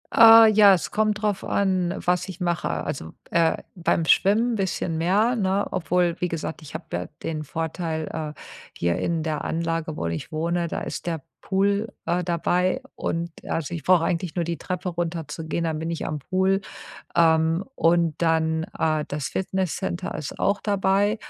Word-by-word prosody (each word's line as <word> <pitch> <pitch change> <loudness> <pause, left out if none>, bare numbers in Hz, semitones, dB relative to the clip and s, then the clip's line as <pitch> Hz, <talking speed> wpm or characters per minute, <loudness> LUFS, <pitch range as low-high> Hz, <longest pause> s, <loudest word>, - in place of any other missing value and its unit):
Äh, 225 -1 +10
ja, 205 -2 +7
es 175 - -4
kommt 215 0 +1
drauf 205 -2 0
an, 185 -2 0
was 180 0 0
ich 185 - -8
mache. 175 -1 -1
Also, 80 0 -4 0.2
äh, 165 -1 +3 0.2
beim 170 -2 +1
Schwimmen 225 +8 +3
bisschen 185 -4 -1
mehr, 205 +8 +2
ne, 195 -2 +1
obwohl, 180 -1 +1
wie 180 - 0
gesagt, 165 -1 -4
ich 155 0 -11
hab 160 - -8
ja 90 +1 -2 0.2
den 155 -1 -3
Vorteil, 160 +1 -3 0.3
äh, - - -19 0.4
hier 85 0 0
in 165 -2 -1
der 155 -2 -2
Anlage, 165 -1 -2
wo - - -3
ich 85 - -4
wohne, 170 +2 -1
da - - -4
ist - - -5
der 165 -4 -2 0.2
Pool, 200 +3 +1 0.2
äh, 175 +1 0
dabei 175 +1 +1
und 170 +1 -2 0.2
also 165 0 -3
ich 165 -5 -5
brauche 180 -3 +4
eigentlich 170 -1 -1
nur 175 -2 0
die 170 0 -3
Treppe 180 +3 -4
runterzugehen, 165 -1 -3
dann 160 -1 -1
bin 165 +1 -3
ich 165 - -3
am 150 - -3
Pool. 190 +6 +1 0.5
Ähm, 165 +1 +3
und 165 -2 +3
dann 160 -1 +1
äh, 155 -1 +1
das 145 -1 -3
Fitnesscenter 190 -1 -2
ist 150 - -6
auch 200 +1 +1
dabei. 200 +1 +2
170 Hz, 170 wpm, -24 LUFS, 160-190 Hz, 0.5 s, Äh